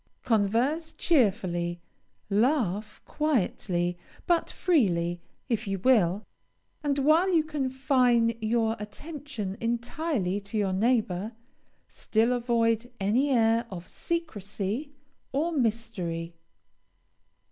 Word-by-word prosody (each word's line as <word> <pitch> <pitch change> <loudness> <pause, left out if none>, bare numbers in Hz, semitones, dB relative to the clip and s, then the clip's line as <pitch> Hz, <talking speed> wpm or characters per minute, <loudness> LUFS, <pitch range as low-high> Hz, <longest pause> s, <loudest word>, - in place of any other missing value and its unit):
Converse 240 +9 +1
cheerfully, 185 - +1 0.5
laugh 215 - 0
quietly, 180 - 0 0.3
but 345 -1 +2
freely, 175 - +1 0.3
if 225 -5 -1
you 195 0 -1
will, 205 -3 +3 0.6
and 285 -1 0
while 315 +7 +4
you 330 -3 +4
confine 260 -5 +2
your 225 0 +1
attention 255 - -6
entirely 235 - -1
to 200 +2 -5
your 200 -3 +1
neighbor, 215 -1 +1 0.5
still 225 +2 0
avoid 235 -1 +1
any 225 +9 +2
air 230 -2 +3
of 180 -2 -8
secrecy 225 - -3 0.4
or 310 +5 +1
mystery. 215 - -2
230 Hz, 90 wpm, -28 LUFS, 195-275 Hz, 0.6 s, while